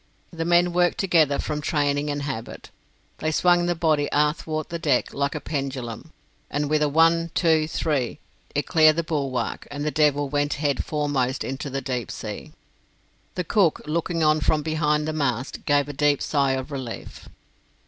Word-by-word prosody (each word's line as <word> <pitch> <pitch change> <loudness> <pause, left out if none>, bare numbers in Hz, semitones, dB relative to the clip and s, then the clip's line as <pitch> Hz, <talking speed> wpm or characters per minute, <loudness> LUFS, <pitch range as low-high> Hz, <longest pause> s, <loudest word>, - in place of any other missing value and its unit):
The 165 -2 -4
men 175 +1 +3
worked 175 0 +2
together 160 -7 +3
from 150 0 -3
training 145 -1 0
and 145 0 -2
habit. 120 -5 -6 0.5
They 155 - -1
swung 175 +2 +3
the 175 - +1
body 155 -3 +1
athwart 155 +1 0
the 170 -1 -4
deck 140 -6 +1
like 140 +2 -1
a - - -2
pendulum, 135 -1 -5 0.4
and 145 0 -2
with 155 0 +2
a 150 - +3
"one! 165 +2 +3
two! 160 -3 +3
three!" 145 -6 -1 0.4
it 145 - 0
cleared 155 -2 +5
the 170 - 0
bulwark, 140 -6 -2
and 145 +1 -5
the 150 - 0
devil 145 -2 +2
went 145 +1 0
head 145 -1 0
foremost 140 -4 -1
into 135 +2 -4
the 135 +1 -3
deep 125 -5 -3
sea. - - -7 0.8
The 180 - -1
cook, 180 -2 +2
looking 165 +1 -1
on 155 0 +4
from 150 0 +1
behind 150 -1 0
the 155 - -2
mast, 135 -4 -2
gave 145 -1 +2
a 145 - -6
deep 145 0 +2
sigh 140 -3 +1
of 130 +2 -4
relief. 130 -4 -7
150 Hz, 175 wpm, -24 LUFS, 140-160 Hz, 0.8 s, cleared